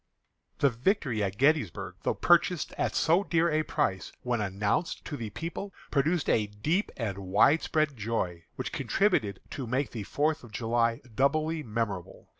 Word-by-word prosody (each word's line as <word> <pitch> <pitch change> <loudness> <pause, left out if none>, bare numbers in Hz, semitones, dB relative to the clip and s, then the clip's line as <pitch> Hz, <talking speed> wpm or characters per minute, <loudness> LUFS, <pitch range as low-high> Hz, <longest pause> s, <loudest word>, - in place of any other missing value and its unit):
The 140 - +3
victory 125 - 0
at 100 -1 -1
Gettysburg, 145 - +1
though - - 0
purchased 175 -1 +3
at - - -1
so 170 +5 +3
dear 170 -3 +2
a 155 +1 +2
price, 95 -10 -1
when 120 -3 0
announced 105 - -1
to 150 - -4
the 115 -6 -5
people, 170 - -5 0.2
produced 155 +3 +1
a 105 -2 +2
deep 150 - -1
and 105 -5 -3
widespread 140 - +3
joy, 100 -7 -2
which - - -4
contributed 110 - +1
to 130 -4 -5
make 130 +3 -1
the 115 - -5
Fourth 150 +9 0
of 120 - -12
July 115 +1 +1
doubly 155 +6 +1
memorable. 105 - -4
125 Hz, 155 wpm, -29 LUFS, 105-155 Hz, 0.2 s, The